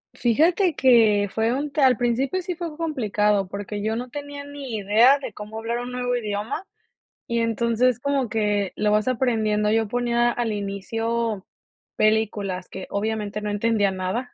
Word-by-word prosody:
Fíjate 325 - +2
que 220 -6 +4
fue 225 +2 +1
un 285 +2 -2
t 295 - -1
al 255 -4 +5
principio 255 +9 0
sí 360 -1 -3
fue 330 -3 -6
complicado, 210 - 0
porque 205 +1 -5
yo 220 +1 0
no 250 +2 -5
tenía 285 0 -7
ni 280 -5 -7
idea 220 +7 +5
de 275 - -7
cómo 210 +1 -8
hablar 230 +2 -2
un 245 +1 -5
nuevo 245 0 -1
idioma 225 - -3 0.6
y 235 -2 -1
entonces 235 +1 +1
como 280 -2 0
que 210 -3 0
lo 210 0 +1
vas 210 +3 +2
aprendiendo, 220 -4 +1
yo 225 0 +2
ponía 240 +1 +1
al 240 -2 -2
inicio 215 +1 -2 0.5
películas, 205 -4 0
que 190 - -8
obviamente 210 0 -2
no 210 - -3
entendía 205 -1 +1
nada. 190 +7 -3
225 Hz, 165 wpm, -23 LUFS, 210-255 Hz, 0.6 s, al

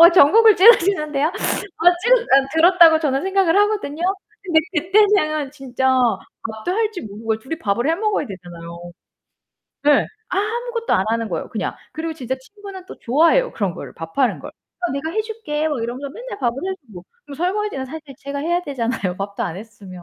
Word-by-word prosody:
어 340 +1 +10
정곡을 395 +6 +6
찌르시는데요? 335 -8 +4
어 - - -4 0.8
찌르 - - +6
어 275 - +3
들었다고 330 -1 +6
저는 275 -3 0
생각을 380 -2 +2
하거든요. 410 -7 0 0.4
근데 340 -5 +3 0.2
그때는 345 -5 +2
진짜 265 -2 -2 0.6
밥도 220 +10 -4
할 435 +2 0
줄 360 - -7
모르고 220 +2 -3
둘이 265 +8 -6
밥을 235 +1 -1
해 325 - +3
먹어야 410 -5 -1
되잖아요. 175 -2 -10 0.9
네. 295 -1 +4 0.2
아무것도 460 +4 -2
안 190 - +3
하는 230 0 -1
거예요, - - -4
그냥. - - -4 0.2
그리고 320 +1 -4
진짜 260 -4 -4
친구는 390 +6 -11
또 - - -11
좋아해요, 330 - +2
그런 200 -5 -2
거를 - - -9
밥하는 165 - -1
걸. - - -9
"어, 355 -1 -7
내가 280 +3 -3
해 435 +5 -1
줄게." 420 -9 -3
막 270 -7 -2
이러면서 255 +4 -5
맨날 - - -8
밥을 240 -2 -1
해주고. 235 - -8 0.2
그럼 285 - -10
설거지는 365 -4 -2
사실 315 +5 -7 0.2
제가 280 0 -5
해야 345 +3 0
되잖아요, 235 - -3
밥도 200 +1 -4
안 170 - -4
했으면. 200 -4 -11
305 Hz, 380 characters per minute, -20 LUFS, 240-380 Hz, 0.9 s, 어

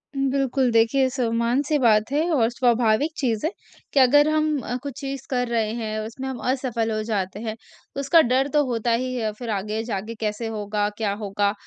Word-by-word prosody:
उ, - - -3
बिल्कुल, 270 -1 +1
देखिए, 230 +4 +3
सामन्य-सी 245 +3 0
बात 220 -2 +3
है 290 +2 +2
और 230 -7 +3
स्वाभाविक 240 +3 +2
चीज़ 235 -2 -1
है 330 - 0 0.4
कि 280 - +4
अगर 290 +3 +6
हम 310 -1 +1
अ, 245 - -4
कुछ 280 -4 -6
चीज़ 275 -1 -5
कर 250 -2 0
रहे 225 -2 0
हैं, 215 -2 -3
उसमें 230 +5 -6
हम 260 -2 -5
असफल 245 -4 -1
हो 215 0 -1
जाते 200 -3 -2
हैं, 220 -1 -4 0.4
उसका 280 +4 +5
डर 265 +2 +3
तो 295 - +4
होता 235 -1 -1
ही 255 - -3
है, 220 -3 -1
फिर 240 -2 -5
आगे 215 +3 -3
जाके 225 0 -4
कैसे 210 +2 -2
होगा, 205 0 -1
क्या 210 -3 0
होगा? 200 0 0
235 Hz, 195 wpm, -23 LUFS, 215-270 Hz, 0.4 s, अगर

